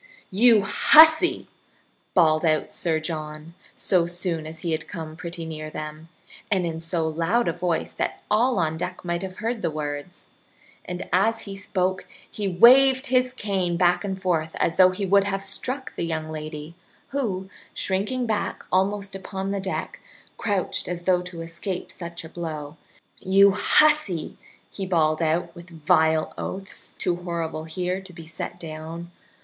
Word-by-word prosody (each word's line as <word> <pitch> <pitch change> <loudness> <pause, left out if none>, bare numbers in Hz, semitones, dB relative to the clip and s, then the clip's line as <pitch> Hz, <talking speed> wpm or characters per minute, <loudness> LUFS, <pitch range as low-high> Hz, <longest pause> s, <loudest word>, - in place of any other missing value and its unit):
"You 220 +1 +6
hussy!" 315 - +6 0.7
bawled 155 -3 +4
out 155 -2 +1
Sir 160 -2 0
John, 155 0 -6 0.2
so 175 -3 +2
soon 175 -2 -3
as 160 0 -8
he 170 - -2
had 155 -1 -2
come 160 -2 -7
pretty 170 0 -6
near 155 -1 -6
them, 155 +1 -7 0.4
and 190 -4 +1
in 165 -1 -3
so 165 0 -1
loud 170 +9 +1
a 170 - +1
voice 175 -1 -1
that - - -3
all 235 +3 +3
on 160 -2 0
deck 180 +2 -5
might 170 0 -1
have 190 -1 -6
heard 225 +1 -2
the - - 0
words; 150 +2 -5 0.6
and 180 0 -5
as 225 +5 +3
he 200 - -7
spoke 190 -1 -2 0.2
he 205 -2 -4
waved 260 +8 +6
his 255 0 +3
cane 190 -7 -1
back 180 +1 +3
and 190 -1 -3
forth 165 -4 -1
as 165 - +1
though 185 -1 +8
he 190 +2 -3
would 200 +1 +4
have 195 -1 -2
struck 255 +7 -2
the - - -4
young 160 -1 -3
lady, 155 0 -6 0.4
who, 205 -9 -2 0.2
shrinking 210 +7 -1
back 220 -2 -2
almost 200 +1 +1
upon 195 0 -4
the 200 - -1
deck, 190 0 -4 0.4
crouched 200 -4 -1
as 175 -1 -4
though 180 0 +3
to 180 -2 -8
escape 170 +3 -5
such 170 0 -7
a 160 - -9
blow. 155 -3 -6 0.4
"You 195 +1 +5
hussy!" 215 - +3 0.3
he 195 -2 -5
bawled 155 -3 +2
out 165 +2 0
with 170 +1 -12
vile 160 -1 +2
oaths, 195 +1 -5
too 175 -2 0
horrible 165 -3 -4
here 180 +3 -3
to 190 -1 -11
be 165 -1 -10
set 165 +2 -6
down. 165 +1 -7
180 Hz, 165 wpm, -24 LUFS, 160-195 Hz, 0.7 s, though